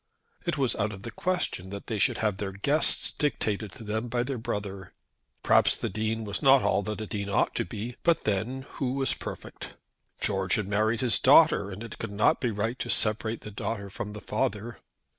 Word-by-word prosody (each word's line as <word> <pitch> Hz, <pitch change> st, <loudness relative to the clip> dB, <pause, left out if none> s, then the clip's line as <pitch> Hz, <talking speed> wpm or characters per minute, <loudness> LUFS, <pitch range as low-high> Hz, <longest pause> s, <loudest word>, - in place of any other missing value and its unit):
It -, -, 0 dB
was 135 Hz, -4 st, +1 dB
out 105 Hz, +1 st, -1 dB
of 100 Hz, 0 st, -10 dB
the 115 Hz, -, -6 dB
question 175 Hz, -, -2 dB
that 100 Hz, +1 st, -7 dB
they 110 Hz, -3 st, -3 dB
should -, -, +2 dB
have 105 Hz, -3 st, 0 dB
their 100 Hz, -1 st, -4 dB
guests 140 Hz, +10 st, +3 dB
dictated 110 Hz, -8 st, -1 dB
to 115 Hz, -, -10 dB
them 110 Hz, +2 st, -2 dB
by 120 Hz, +1 st, 0 dB
their 130 Hz, -1 st, -4 dB
brother. 100 Hz, -3 st, -5 dB, 0.5 s
Perhaps -, -, +4 dB
the -, -, -3 dB
Dean 110 Hz, +2 st, -2 dB
was 100 Hz, -2 st, -3 dB
not 135 Hz, -1 st, +6 dB
all -, -, +2 dB
that 105 Hz, +2 st, -4 dB
a -, -, -3 dB
dean 100 Hz, -1 st, -4 dB
ought 100 Hz, -, +1 dB
to -, -, -1 dB
be, 115 Hz, +4 st, -6 dB
but 170 Hz, -1 st, +2 dB
then, 110 Hz, +6 st, -1 dB, 0.2 s
who 130 Hz, -2 st, 0 dB
was 135 Hz, -2 st, +3 dB
perfect? -, -, -8 dB, 0.4 s
George 95 Hz, -3 st, +1 dB
had 105 Hz, -3 st, -2 dB
married 110 Hz, +2 st, +1 dB
his 125 Hz, -3 st, +2 dB
daughter, 140 Hz, -6 st, +6 dB
and 100 Hz, +3 st, -7 dB
it 115 Hz, -, -9 dB
could 115 Hz, -, -4 dB
not 100 Hz, +2 st, +2 dB
be 125 Hz, -, +1 dB
right 115 Hz, +4 st, -2 dB
to -, -, -4 dB
separate 110 Hz, +1 st, +2 dB
the 105 Hz, -, -8 dB
daughter 100 Hz, -1 st, -4 dB
from 105 Hz, 0 st, -5 dB
the 105 Hz, -, -8 dB
father. 110 Hz, +3 st, -2 dB
110 Hz, 210 wpm, -28 LUFS, 100-120 Hz, 0.5 s, not